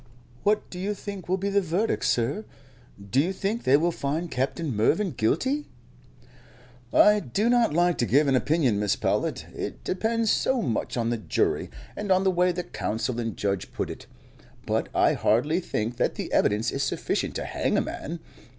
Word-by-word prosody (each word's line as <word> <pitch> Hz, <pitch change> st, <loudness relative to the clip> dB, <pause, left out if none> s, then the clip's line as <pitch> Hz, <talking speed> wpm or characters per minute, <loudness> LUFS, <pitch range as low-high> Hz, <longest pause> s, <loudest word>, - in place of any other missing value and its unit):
"What 210 Hz, +1 st, +1 dB
do 180 Hz, -, -7 dB
you 205 Hz, +3 st, -2 dB
think 200 Hz, -2 st, -7 dB
will 185 Hz, -, +2 dB
be 200 Hz, +1 st, -2 dB
the 200 Hz, 0 st, +3 dB
verdict, 185 Hz, +5 st, 0 dB
sir? 130 Hz, -, +1 dB, 0.7 s
Do 130 Hz, -, +3 dB
you 175 Hz, +5 st, 0 dB
think 200 Hz, +4 st, -2 dB
they 135 Hz, +2 st, +6 dB
will 170 Hz, +3 st, +1 dB
find 160 Hz, +3 st, -3 dB
Captain 135 Hz, +2 st, -2 dB
Mervyn 165 Hz, -, +2 dB
guilty?" 255 Hz, -, 0 dB, 1.2 s
"I 210 Hz, 0 st, +6 dB
do 205 Hz, -, 0 dB
not 240 Hz, -9 st, +3 dB
like 175 Hz, 0 st, +2 dB
to 120 Hz, -, +1 dB
give 145 Hz, +3 st, +4 dB
an 135 Hz, -, +3 dB
opinion, 130 Hz, -6 st, +2 dB
Mrs. 105 Hz, -1 st, 0 dB
Powlett. -, -, -1 dB
It -, -, -5 dB
depends 225 Hz, +3 st, 0 dB
so 265 Hz, -1 st, +2 dB
much 120 Hz, 0 st, -2 dB
on 115 Hz, 0 st, 0 dB
the 120 Hz, -, 0 dB
jury, -, -, 0 dB, 0.3 s
and 205 Hz, -2 st, -3 dB
on 185 Hz, 0 st, +4 dB
the 190 Hz, -, +3 dB
way 180 Hz, 0 st, +3 dB
the 180 Hz, 0 st, -3 dB
counsel 115 Hz, -3 st, -3 dB
and 115 Hz, -2 st, -3 dB
judge 100 Hz, -2 st, -2 dB
put -, -, -3 dB
it, -, -, -10 dB, 0.6 s
but -, -, -1 dB
I -, -, +4 dB
hardly 145 Hz, +11 st, +2 dB
think 120 Hz, -8 st, -3 dB
that -, -, 0 dB
the -, -, -5 dB
evidence 105 Hz, +3 st, +2 dB
is 135 Hz, -, -2 dB
sufficient 135 Hz, -, -1 dB
to -, -, -3 dB
hang -, -, 0 dB
a -, -, +3 dB
man. 165 Hz, +2 st, -6 dB
165 Hz, 185 wpm, -26 LUFS, 120-200 Hz, 1.2 s, they